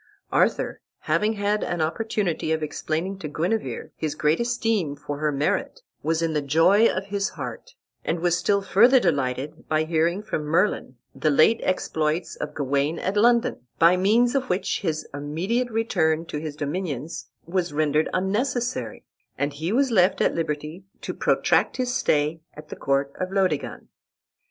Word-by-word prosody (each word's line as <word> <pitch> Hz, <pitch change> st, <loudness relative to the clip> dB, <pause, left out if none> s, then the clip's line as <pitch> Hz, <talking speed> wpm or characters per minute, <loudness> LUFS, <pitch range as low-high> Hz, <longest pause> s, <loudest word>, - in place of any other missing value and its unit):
Arthur, -, -, +1 dB, 0.2 s
having 215 Hz, +1 st, +1 dB
had 205 Hz, 0 st, 0 dB
an 175 Hz, -, -2 dB
opportunity 175 Hz, 0 st, -1 dB
of 160 Hz, -1 st, 0 dB
explaining 160 Hz, +5 st, -3 dB
to 155 Hz, -, -5 dB
Guenever 155 Hz, -, -2 dB
his 155 Hz, -1 st, -3 dB
great 150 Hz, +1 st, +2 dB
esteem 225 Hz, -10 st, 0 dB
for 145 Hz, 0 st, -6 dB
her 155 Hz, 0 st, +1 dB
merit, 150 Hz, -, -1 dB, 0.2 s
was 160 Hz, +1 st, 0 dB
in 165 Hz, -1 st, 0 dB
the 150 Hz, -, +1 dB
joy 165 Hz, +10 st, +4 dB
of 190 Hz, +1 st, -2 dB
his 200 Hz, 0 st, -1 dB
heart, 125 Hz, -5 st, -7 dB, 0.3 s
and 165 Hz, -, -1 dB
was 175 Hz, 0 st, +2 dB
still 200 Hz, +3 st, +1 dB
further 235 Hz, +7 st, +5 dB
delighted 140 Hz, -, -2 dB
by 155 Hz, 0 st, +2 dB
hearing 165 Hz, +4 st, 0 dB
from 210 Hz, -7 st, -3 dB
Merlin 160 Hz, -3 st, 0 dB, 0.2 s
the 155 Hz, -, 0 dB
late 155 Hz, +10 st, +5 dB
exploits 160 Hz, -2 st, -1 dB
of 150 Hz, 0 st, -6 dB
Gawain 140 Hz, +3 st, 0 dB
at 190 Hz, -, -2 dB
London, 235 Hz, +2 st, +3 dB, 0.2 s
by 170 Hz, +2 st, +6 dB
means 220 Hz, +6 st, +3 dB
of 265 Hz, -2 st, -1 dB
which 180 Hz, -, -1 dB
his 160 Hz, -4 st, -2 dB
immediate 170 Hz, -, -1 dB
return 175 Hz, -8 st, +1 dB
to 150 Hz, -, -5 dB
his 155 Hz, -1 st, -5 dB
dominions 150 Hz, -1 st, -4 dB, 0.2 s
was 175 Hz, -1 st, -1 dB
rendered 150 Hz, +1 st, +1 dB
unnecessary, 240 Hz, +6 st, -1 dB, 0.3 s
and 145 Hz, 0 st, -1 dB
he 160 Hz, +5 st, -3 dB
was 265 Hz, +3 st, +2 dB
left 185 Hz, -3 st, +3 dB
at -, -, +2 dB
liberty 155 Hz, +2 st, -3 dB, 0.2 s
to -, -, -4 dB
protract -, -, +2 dB
his 250 Hz, -1 st, -1 dB
stay 155 Hz, -, +1 dB
at 150 Hz, 0 st, -12 dB
the -, -, -6 dB
court 140 Hz, 0 st, 0 dB
of 185 Hz, 0 st, -2 dB
Laodegan. 195 Hz, -1 st, -1 dB
165 Hz, 160 wpm, -24 LUFS, 150-205 Hz, 0.3 s, by